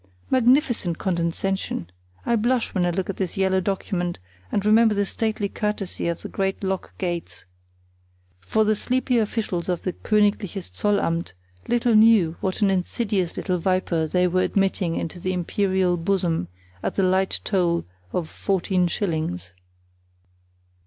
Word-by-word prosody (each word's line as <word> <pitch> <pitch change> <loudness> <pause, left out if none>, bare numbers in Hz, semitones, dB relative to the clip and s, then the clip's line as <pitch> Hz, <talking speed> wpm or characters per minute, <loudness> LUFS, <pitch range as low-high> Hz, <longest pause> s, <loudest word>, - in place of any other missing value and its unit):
Magnificent 245 - +3
condescension! 175 - -1 0.4
I 235 - +2
blush 240 +2 +1
when 180 -2 +1
I - - +2
look 180 +2 -2
at 195 - -4
this 190 -2 -3
yellow 190 -1 +2
document 180 -2 -2 0.3
and 205 - 0
remember 220 0 +5
the 200 0 +1
stately 215 0 -1
courtesy 210 -3 -3
of 170 -1 -3
the - - -4
great 195 0 -2
lock 190 -1 -3
gates; 175 -3 -4 0.9
for 155 - +1
the 215 0 +3
sleepy 250 +2 +1
officials 210 -5 -2
of 175 -2 -1
the 185 - -2
Königliches 205 -3 0
Zollamt 175 - 0 0.3
little 240 0 +2
knew 215 -7 +5
what 190 +2 -1
an 200 - +4
insidious 190 -1 -1
little 180 -2 -1
viper 175 -3 0
they 180 +3 +2
were 185 +1 +1
admitting 190 -3 +1
into 170 +2 -4
the 185 +2 -2
imperial 185 0 +1
bosom 170 - 0 0.3
at - - -2
the 195 - +2
light 190 +1 +2
toll 175 -4 +1 0.3
of 170 - -2
fourteen 185 0 0
shillings. 155 - -2
190 Hz, 145 wpm, -24 LUFS, 175-210 Hz, 0.9 s, remember